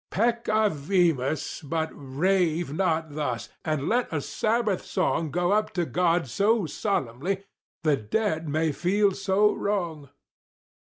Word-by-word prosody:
Peccavimus; 185 - +1
but 160 +1 -2
rave 165 +2 0
not 160 -3 0
thus! 135 -6 -3
and 155 -3 -1
let 245 +2 +1
a 160 - 0
Sabbath 215 +5 0
song 160 -1 0
Go 175 +5 0
up 215 +1 +2
to 175 -2 0
God 175 -2 +1
so 205 - +2
solemnly 180 - -2 0.4
the 150 -3 +3
dead 160 - -1
may 155 +2 +1
feel 195 +7 +2 0.2
no 205 +2 +4
wrong! 170 -9 -2
170 Hz, 120 wpm, -26 LUFS, 150-200 Hz, 0.4 s, no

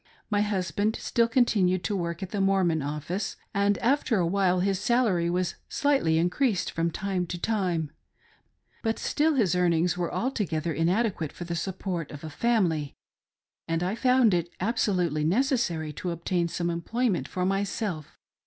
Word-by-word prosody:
My 205 0 +3
husband 205 +1 0
stilL 235 -1 +1
continued 200 -7 +2
to 205 - -1
work 170 0 -3
at 185 - -6
the 205 - -1
Mormon 190 -5 +2
office, 150 +7 -3 0.2
and 200 0 +2
after 260 -2 +1
a 175 - +2
while 185 0 +2
his 195 0 +1
salary 205 -8 +2
was 180 0 0 0.2
slightly 270 - +2
increased 185 - +1
from 165 +1 0
time 185 0 -2
to 175 - -4
time; 175 -7 -1 0.9
but 225 -1 0
still 310 +1 +1
his 205 -10 +2
earnings 175 0 +2
were 175 - -1
altogether 175 - -1
inadequate 175 - 0
for - - -8
the 170 0 -4
support 175 -2 -3
of 145 +1 -9
a 155 - -6
faipily, 170 -9 0 0.7
and 165 +1 0
I 185 +3 0
found 250 -2 +4
it 175 -1 0
absolutely 180 - 0
necessary 175 - +1
to 180 - -4
obtain 170 +1 -1
some 170 0 -2
employment 200 +4 -1
for 180 0 -2
myself. 195 -4 -2
185 Hz, 155 wpm, -27 LUFS, 170-215 Hz, 0.9 s, found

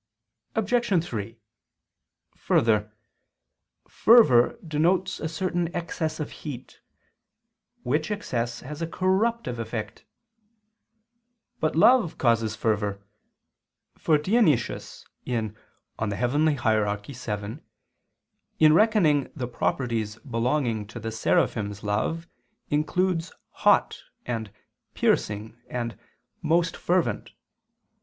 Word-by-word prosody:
Obj. 220 -5 +1
3: 115 - -5 1.0
Further, 105 -2 +1 1.0
fervor 145 - +5
denotes 165 +4 +1
a 160 - -3
certain 175 +1 -1
excess 165 -2 -3
of 150 - -4
heat; 130 -5 -9 1.0
which 150 +5 0
excess 120 - -3
has 150 +4 -8
a 165 - -1
corruptive 190 - 0
effect. 115 -1 -5 1.6
But 155 - 0
love 225 +1 +5
causes 115 -3 +1
fervor: 105 -2 -1 0.9
for 155 - +2
Dionysius 170 - +1 0.2
(Coel. 115 -4 -1 0.5
Hier. 110 -2 +1
vii) 105 0 -6 1.0
in 155 -1 +6
reckoning 165 - +3
the 130 -5 -3
properties 115 -3 -1
belonging 120 -3 -1
to 110 +3 -8
the 115 0 -4
Seraphim's 105 -2 0
love, 110 +11 -1 0.4
includes 165 +3 0 0.2
"hot" - - +2 0.2
and 110 -4 -4 0.4
"piercing" 110 +3 0
and 120 -2 -4 0.5
"most 165 +2 +1
fervent." 180 -1 -1
130 Hz, 90 wpm, -26 LUFS, 110-165 Hz, 1.6 s, in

